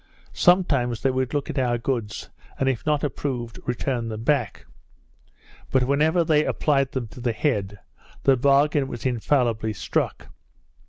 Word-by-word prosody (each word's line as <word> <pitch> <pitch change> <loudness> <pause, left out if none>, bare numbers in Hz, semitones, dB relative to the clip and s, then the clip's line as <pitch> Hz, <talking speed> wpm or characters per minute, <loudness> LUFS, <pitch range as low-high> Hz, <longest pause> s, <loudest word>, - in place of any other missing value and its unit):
Sometimes 140 -10 +2
they 135 - +3
would 130 -1 -1
look 145 -1 -2
at 135 - -2
our 120 -2 +1
goods, 115 -3 -3 0.3
and 135 - 0
if 130 +1 -1
not 150 -2 +1
approved, 125 -5 -3
return 125 -1 -2
them 110 0 -5
back; 125 -6 0 1.0
but 130 -1 +2
whenever 155 +6 +2
they 155 -2 +3
applied 135 -4 +1
them 130 -3 -3
to 125 - -11
the 120 -1 0
head, 105 -7 -1 0.5
the 135 - +5
bargain 140 +2 +3
was 120 -1 -7
infallibly 120 -3 +1
struck. - - -2
130 Hz, 150 wpm, -24 LUFS, 120-145 Hz, 1.0 s, the